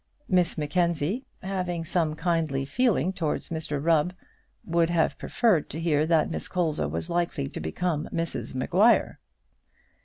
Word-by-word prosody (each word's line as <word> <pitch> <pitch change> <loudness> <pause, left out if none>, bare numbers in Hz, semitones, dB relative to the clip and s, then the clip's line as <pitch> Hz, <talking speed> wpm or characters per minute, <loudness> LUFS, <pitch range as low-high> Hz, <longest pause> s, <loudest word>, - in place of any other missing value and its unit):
Miss 180 -3 +2
Mackenzie, 170 - 0 0.2
having 180 -3 -2
some 160 -2 0
kindly 160 -5 0
feeling 190 - +1
towards 160 -5 -2
Mr 160 -3 -3
Rubb, 165 +3 +2 0.5
would 170 -1 +2
have 170 -2 +2
preferred 215 -10 +1
to 160 - -4
hear 155 -2 +1
that 160 -2 +2
Miss - - -3
Colza 155 - -1
was 80 +2 -3
likely 170 -4 -1
to - - -7
become 170 -4 -2
Mrs 165 -5 -3
Maguire. 195 - +3
165 Hz, 135 wpm, -26 LUFS, 150-180 Hz, 0.5 s, Maguire